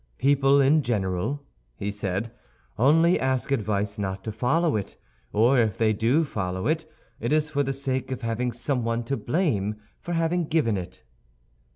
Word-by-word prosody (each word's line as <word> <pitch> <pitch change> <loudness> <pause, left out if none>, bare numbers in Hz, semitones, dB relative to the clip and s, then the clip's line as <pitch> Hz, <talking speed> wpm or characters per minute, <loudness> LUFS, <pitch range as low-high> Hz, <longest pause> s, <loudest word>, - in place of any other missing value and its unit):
"People, 140 0 +4
in 140 +3 +5
general," 110 +3 -1 0.3
he 100 +8 -3
said, 100 +2 -3 0.4
"only 165 +8 +4
ask 130 +1 -1
advice 105 -4 -1
not 95 -1 -3
to 110 - -4
follow 145 +9 +1
it; 100 -4 -4 0.3
or 120 +5 +4
if 110 -4 +1
they 110 -1 +3
do 120 +9 +2
follow 95 - -3
it, 155 0 -1 0.3
it 115 - -2
is 155 0 +2
for 145 -1 +1
the 135 -1 0
sake 130 -1 -2
of 130 - -4
having 115 +2 -1
someone 120 -1 -1
to 135 +4 -2
blame 115 - 0 0.2
for 175 - -5
having 165 +1 +1
given 150 -10 +1
it." 90 -1 -7
125 Hz, 165 wpm, -25 LUFS, 105-145 Hz, 0.4 s, in